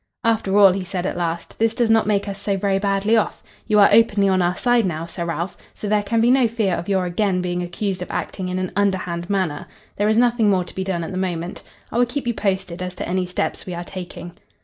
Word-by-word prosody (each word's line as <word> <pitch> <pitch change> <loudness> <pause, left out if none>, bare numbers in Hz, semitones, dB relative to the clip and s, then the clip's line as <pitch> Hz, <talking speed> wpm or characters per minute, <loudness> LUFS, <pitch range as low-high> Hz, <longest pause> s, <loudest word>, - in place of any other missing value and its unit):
"After 220 -4 +1
all," 200 -2 +8
he 190 +1 -2
said 185 0 -4
at - - -2
last, 170 -1 -4
"this 225 0 +2
does 235 -2 +2
not 225 -1 +4
make 205 -1 +1
us 200 0 -5
so 200 -1 0
very 195 0 +1
badly 200 +2 +1
off. 220 - 0 0.2
You 210 - +3
are 200 - +7
openly 210 -2 +4
on 185 -1 +3
our 175 +1 +1
side 245 +2 +2
now, 165 -4 -2
Sir 170 0 -5
Ralph, 170 +2 -3 0.2
so 210 - -6
there 210 0 +2
can 225 +3 0
be 240 +2 +4
no 260 -2 +4
fear 220 -5 0
of 175 - -3
your 190 -2 +1
again 180 +1 0
being 180 0 -2
accused 185 +2 -3
of 180 - -5
acting 185 -2 -4
in 180 - -2
an 185 -1 -2
underhand 185 -3 -1
manner. 185 -7 -1 0.3
There 205 +1 +2
is 220 - +2
nothing 235 -3 +3
more 185 -2 +2
to 175 - -12
be 190 - -3
done 185 -3 -2
at 165 - -5
the 185 - -4
moment. 180 -1 -3 0.3
I 235 - 0
will 245 - +4
keep 270 +3 -4
you 240 - 0
posted 190 -4 -2
as 180 0 -4
to - - -5
any 180 +1 -1
steps 180 - -3
we 180 - -4
are 175 - -4
taking." 175 -1 -8
195 Hz, 260 wpm, -21 LUFS, 180-215 Hz, 0.3 s, all